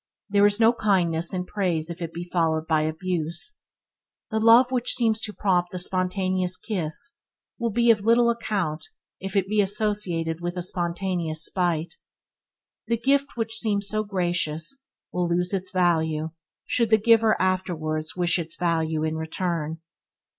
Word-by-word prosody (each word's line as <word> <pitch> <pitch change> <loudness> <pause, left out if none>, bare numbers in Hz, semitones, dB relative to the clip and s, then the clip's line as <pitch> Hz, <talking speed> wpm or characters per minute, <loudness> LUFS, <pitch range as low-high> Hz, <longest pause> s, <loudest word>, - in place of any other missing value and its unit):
There 200 0 +5
is 205 +1 0
no 230 +1 +5
kindness 175 -7 +1
in 180 -1 -3
praise 180 -6 -1
if 170 +1 -9
it 165 -1 -4
be 170 +1 -6
followed 165 -3 0
by 160 -1 +2
abuse. 170 - -2 0.7
The 220 - 0
love 230 +3 +6
which 250 -2 +1
seems 225 -3 +1
to 215 - -1
prompt 180 -4 +1
the 180 - -6
spontaneous 185 0 0
kiss 215 - -4 0.4
will 235 -1 0
be 235 +2 +4
of 215 -3 +1
little 235 +2 +4
account 195 -9 -2 0.4
if 195 +1 -6
it 195 -1 +2
be 210 +1 +2
associated 190 -5 -1
with 175 +1 -4
a 180 - -2
spontaneous 170 -2 -2
spite. 170 -3 -1 0.9
The 235 - +1
gift 275 +3 +1
which 225 -1 0
seemed 205 -3 +1
so 215 +2 +1
gracious 175 - -2 0.3
will 180 -1 0
lose 180 +2 0
its 190 -1 -1
value 160 -3 +1 0.3
should 235 -3 +1
the 220 - +6
giver 225 0 +4
afterwards 165 -4 -1
wish 175 0 +1
its 165 -1 -4
value 160 -2 0
in 160 0 -1
return. 160 -1 -3
185 Hz, 155 wpm, -25 LUFS, 165-215 Hz, 0.9 s, love